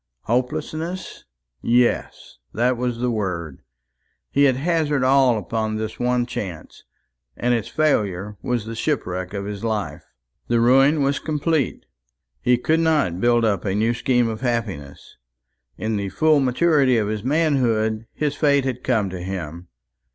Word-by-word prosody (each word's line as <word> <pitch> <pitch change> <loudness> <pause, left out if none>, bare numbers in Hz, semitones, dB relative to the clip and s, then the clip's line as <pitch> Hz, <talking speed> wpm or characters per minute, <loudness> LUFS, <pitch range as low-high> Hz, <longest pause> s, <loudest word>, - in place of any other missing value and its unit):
Hopelessness! 155 +9 -3 0.4
yes, 120 0 0 0.2
that 125 +3 +2
was 120 -1 -2
the 125 +1 0
word. 90 - -3 0.7
He 140 +1 +4
had 130 -2 +4
hazarded 150 -1 0
all 130 -2 +4
upon 110 +2 -2
this 110 0 -4
one 125 0 +1
chance, 90 -9 -7 0.5
and 125 0 +1
its 115 -3 -1
failure 105 - 0
was 120 -4 -2
the 115 - -6
shipwreck 95 - -2
of 100 0 -4
his 100 0 -6
life. 110 -3 -3 0.4
The 120 -1 +2
ruin 135 +5 +4
was 140 0 +1
complete. 155 -2 -1 0.6
He 125 0 +3
could 160 +6 +1
not 150 - +1
build 120 -1 +3
up 100 -5 0
a 95 -2 -1
new 110 +3 +2
scheme 120 0 +1
of 110 0 -4
happiness. 105 - -4 0.6
In 110 0 -2
the 100 -1 -3
full 155 +6 +3
maturity 135 -1 +3
of 105 -2 0
his 105 -1 -3
manhood, 120 -7 +1
his 150 -2 -1
fate 140 -2 +2
had 125 -2 -3
come 110 -7 +1
to 90 -1 -6
him. 90 -2 -6
120 Hz, 150 wpm, -22 LUFS, 105-135 Hz, 0.7 s, He